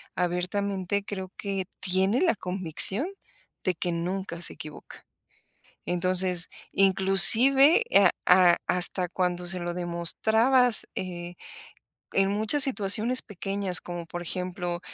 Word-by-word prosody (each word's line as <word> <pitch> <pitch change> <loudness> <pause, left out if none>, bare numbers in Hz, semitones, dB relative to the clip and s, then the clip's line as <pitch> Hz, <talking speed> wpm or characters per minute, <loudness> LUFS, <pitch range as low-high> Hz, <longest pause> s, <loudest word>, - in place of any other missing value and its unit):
abiertamente 190 +2 -3
creo 190 -2 -8
que 195 -2 -5 0.2
tiene 190 - -1
la 345 -9 +1
convicción 190 - +1 0.6
de 185 - -1
que 175 +2 -4
nunca 170 +1 -6
se - - +1
equivoca. 155 -1 -13 0.8
Entonces, 180 0 +1 0.2
inclusive, 220 - +6
ah, 195 -3 +5 0.2
ah, 180 -1 +4
hasta 180 0 0
cuando 180 0 -4
se 180 +1 -3
lo 175 0 -5
demostrabas, 220 +8 +2
eh, 175 -1 -7 0.8
en 195 0 0
muchas 220 +8 -1
situaciones 230 0 +1
pequeñas 195 -1 -3
como, 175 -1 -8
por 175 +1 -8
ejemplo, 180 -1 -6
185 Hz, 115 wpm, -24 LUFS, 175-200 Hz, 0.8 s, inclusive